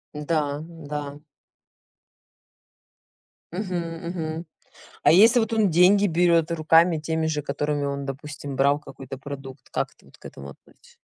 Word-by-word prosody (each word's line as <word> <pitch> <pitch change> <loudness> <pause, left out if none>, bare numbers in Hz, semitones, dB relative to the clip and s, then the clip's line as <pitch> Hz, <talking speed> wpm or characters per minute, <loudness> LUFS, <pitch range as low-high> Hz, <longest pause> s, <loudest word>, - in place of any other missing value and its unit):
Да, 150 -1 -1
да. 145 -3 -6 2.3
Мгм. 185 0 -3 0.3
Мгм. 165 -1 -4 0.6
А - - +7
если 225 +8 +7
вот 225 0 -2
он 215 -4 +3
деньги 185 +5 +5
берет 170 -2 +2
руками 165 +1 +4
теми 160 +1 -1
же, 150 -2 -1
которыми 145 +1 -2
он, 140 0 -3
допустим, 140 0 -7
брал 140 +2 +3
какой-то 135 -2 -10
продукт, 135 -1 -9
как - - -2
ты - - -25
вот - - -20
к - - -24
этому 70 0 -9
относь - - -21
155 Hz, 135 wpm, -24 LUFS, 140-170 Hz, 2.3 s, А